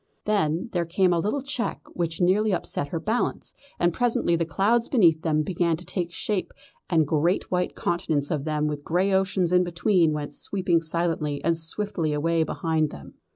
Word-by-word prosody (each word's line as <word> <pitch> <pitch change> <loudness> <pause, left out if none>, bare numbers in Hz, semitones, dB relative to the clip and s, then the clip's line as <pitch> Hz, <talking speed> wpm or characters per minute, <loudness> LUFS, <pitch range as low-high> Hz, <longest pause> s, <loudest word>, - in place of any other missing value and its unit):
Then 195 -1 0
there 175 -2 +1
came 180 +2 +2
a 170 - +1
little 215 +10 -1
check 265 -4 -2
which 165 -2 -2
nearly 195 +4 +3
upset 145 - -2
her 165 +3 -3
balance, 220 +8 -2 0.3
and 175 -1 +2
presently 230 -7 +1
the 165 -1 -1
clouds 225 +6 +1
beneath 170 - +4
them 155 -2 +1
began 170 -1 0
to 180 - -8
take 175 -3 -3
shape 195 +2 -2 0.4
and 160 -3 +3
great 160 +5 0
white 180 0 0
continents 155 -4 -1
of 150 -4 -1
them 150 -1 -1
with 150 -1 -3
grey 185 +5 +1
oceans 190 -2 +1
in 180 0 +4
between 175 -1 +2
went 150 -1 -4
sweeping 180 -4 0
silently 160 -3 -1
and 170 +1 +2
swiftly 165 -1 -1
away 165 +3 +1
behind 160 0 0
them. 70 - -11
170 Hz, 180 wpm, -25 LUFS, 160-190 Hz, 0.4 s, beneath